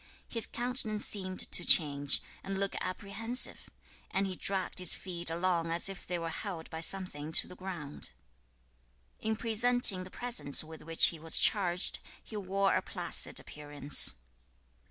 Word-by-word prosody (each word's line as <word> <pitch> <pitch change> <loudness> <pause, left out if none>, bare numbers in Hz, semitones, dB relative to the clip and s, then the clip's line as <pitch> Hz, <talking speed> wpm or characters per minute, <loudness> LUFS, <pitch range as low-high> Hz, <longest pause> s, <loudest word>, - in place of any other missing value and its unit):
His 230 -2 +1
countenance 240 -3 0
seemed 185 -2 +1
to - - +3
change, 145 -3 +3 0.2
and 195 0 -5
look 195 0 -2
apprehensive, 205 +6 -2 0.4
and 195 +1 -1
he 190 -1 -4
dragged 190 0 -1
his 180 -2 +2
feet 175 -2 -4
along 170 0 -1
as 170 +3 0
if 195 - -10
they 180 - -2
were 165 -1 -5
held 170 -2 -7
by 160 - -6
something 160 -4 +2
to - - +2
the 180 - -12
ground. 175 -6 -6 1.1
2. - - -5
In 220 - 0
presenting 230 -3 +4
the 185 - -11
presents 240 - +1
with 160 0 -12
which 165 +1 +4
he 165 - -8
was 160 +1 +3
charged, 180 -3 +2 0.2
he 220 - -11
wore 195 0 0
a - - +1
placid - - +1
appearance. 145 -1 +1
185 Hz, 155 wpm, -31 LUFS, 165-200 Hz, 1.1 s, presenting